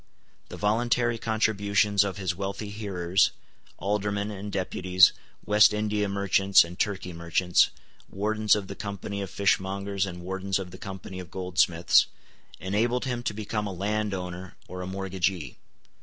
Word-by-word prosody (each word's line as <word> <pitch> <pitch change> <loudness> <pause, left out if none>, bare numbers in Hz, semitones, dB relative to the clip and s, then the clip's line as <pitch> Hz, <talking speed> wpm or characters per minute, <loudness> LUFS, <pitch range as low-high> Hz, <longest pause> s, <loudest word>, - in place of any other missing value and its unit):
The - - -8
voluntary 120 +2 +1
contributions 100 -2 +2
of 100 -1 -3
his 95 -3 -1
wealthy 100 +2 -4
hearers, 95 -4 +1 0.5
Aldermen 100 +1 -1
and 100 0 -6
Deputies, 95 -1 +4 0.3
West 105 0 +5
India 105 -1 0
merchants 100 0 +4
and 85 +2 -10
Turkey 95 -3 -2
merchants, 85 +2 +2 0.4
Wardens 105 +2 +2
of 105 -2 -3
the 100 - -7
Company 100 0 -5
of 95 - -4
Fishmongers 100 0 0
and 90 -1 -7
Wardens 95 +1 -2
of 95 -2 -6
the 95 - -11
Company 95 -1 -7
of 90 -2 -8
Goldsmiths, 90 -2 +3 0.5
enabled 110 +8 0
him 125 -2 -2
to 120 -3 -2
become 105 0 -3
a - - -4
landowner 95 -2 -3
or 90 0 -7
a 90 - -5
mortgagee. 95 -5 -2
100 Hz, 140 wpm, -27 LUFS, 95-105 Hz, 0.5 s, West